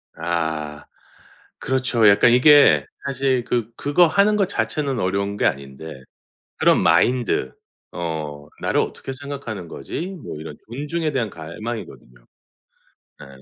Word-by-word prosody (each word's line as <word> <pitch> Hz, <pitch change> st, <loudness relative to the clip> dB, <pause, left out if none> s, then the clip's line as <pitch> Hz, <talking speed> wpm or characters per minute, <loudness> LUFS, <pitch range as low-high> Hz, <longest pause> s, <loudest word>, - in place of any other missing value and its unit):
아 80 Hz, -3 st, -3 dB, 0.7 s
그렇죠. 130 Hz, -4 st, +2 dB
약간 100 Hz, +4 st, +6 dB
이게 145 Hz, +4 st, +6 dB, 0.2 s
사실 135 Hz, -2 st, 0 dB
그 120 Hz, -1 st, -2 dB
그거 145 Hz, +6 st, +3 dB
하는 200 Hz, +5 st, +3 dB
것 200 Hz, -3 st, +2 dB
자체는 135 Hz, -, -2 dB
어려운 100 Hz, +1 st, -1 dB
게 -, -, 0 dB
아닌데 70 Hz, +1 st, -4 dB, 0.6 s
그런 -, -, +4 dB
마인드 125 Hz, 0 st, +2 dB, 0.4 s
어 75 Hz, -4 st, -5 dB
'나를 -, -, +1 dB
어떻게 -, -, -5 dB
생각하는 135 Hz, -9 st, -7 dB
거지?' 80 Hz, -, -6 dB, 0.2 s
뭐 -, -, -7 dB
이런 80 Hz, -1 st, -8 dB
존중에 150 Hz, +6 st, -3 dB
대한 120 Hz, -6 st, -1 dB
갈망이거든요. 80 Hz, -, -8 dB, 1.0 s
예. -, -, -11 dB
115 Hz, 260 characters per minute, -22 LUFS, -, 1.0 s, 약간